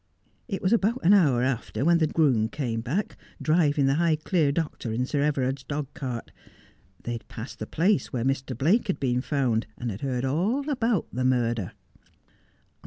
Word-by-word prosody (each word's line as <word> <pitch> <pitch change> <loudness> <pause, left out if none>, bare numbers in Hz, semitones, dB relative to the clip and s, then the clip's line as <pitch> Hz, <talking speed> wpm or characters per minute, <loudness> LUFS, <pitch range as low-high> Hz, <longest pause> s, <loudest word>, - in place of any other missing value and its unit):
It 195 -5 -4
was 190 +4 +3
about 230 +2 +2
an 190 - +7
hour 140 -11 +4
after 130 +1 -1
when 170 0 +5
the 160 - +3
groom 130 -9 +2
came 115 -6 -3
hack, 165 - -2 0.2
driving 155 -3 +2
the 135 +2 +2
Highclere 160 -1 +2
doctor 150 -6 -3
in 120 +3 0
Sir 140 +2 0
E 150 - +3
vera 135 -3 0
id's 135 0 -5
dogcart. 135 -4 -5 0.7
They 120 - -4
had 115 -1 -6
pa>sid 115 +1 -8
the 110 - -5
place 190 +5 +1
where 120 -1 -2
Mr. 130 -2 -1
Blake 180 - +2
had 190 - -1
luen 125 -1 0
found, 130 -7 0
and 120 -2 -3
had 100 - -7
heaid 130 -2 -2
all 200 - 0
about 230 - +1
the 130 - -1
murder.' 120 -6 0
140 Hz, 180 wpm, -26 LUFS, 125-170 Hz, 0.7 s, an